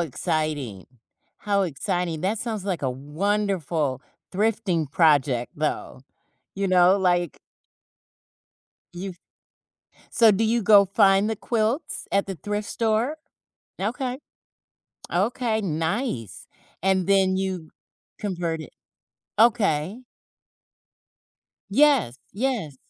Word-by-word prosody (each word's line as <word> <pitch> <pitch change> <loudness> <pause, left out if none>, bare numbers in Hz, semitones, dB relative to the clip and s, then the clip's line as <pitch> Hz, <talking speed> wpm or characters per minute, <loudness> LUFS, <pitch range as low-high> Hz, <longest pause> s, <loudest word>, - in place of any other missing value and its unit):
exciting, 155 - -2 0.5
how 200 -1 +1
exciting. 175 0 -2
That 200 +4 -1
sounds 220 -5 -4
like 180 -7 -2
a 130 - 0
wonderful 155 -1 -1 0.3
thrifting 195 -7 0
project 145 -6 +2
though, 150 -3 -3 0.5
you 195 0 -1
know, 185 +1 +5
like 175 -3 +1 1.5
You've 180 0 -7 0.9
So 225 -2 +6
do 205 +2 +1
you 230 +1 +2
go 200 -2 +7
find 195 +1 +3
the 220 - -1
quilts 230 +8 -2
at 200 0 +2
the 195 - -4
thrift 205 +5 -4
store? 230 +6 0 0.6
Okay. 250 +5 -2 0.9
Okay, 220 +3 0
nice, 160 - -3 0.3
and 190 -1 +2
then 190 -1 +3
you 185 -4 -3 0.5
convert 175 -5 -2
it? 145 - -11 0.7
Okay. 215 -3 +2 1.7
Yes. 260 - +3
Yes. 215 - -2
190 Hz, 95 wpm, -24 LUFS, 160-215 Hz, 1.7 s, go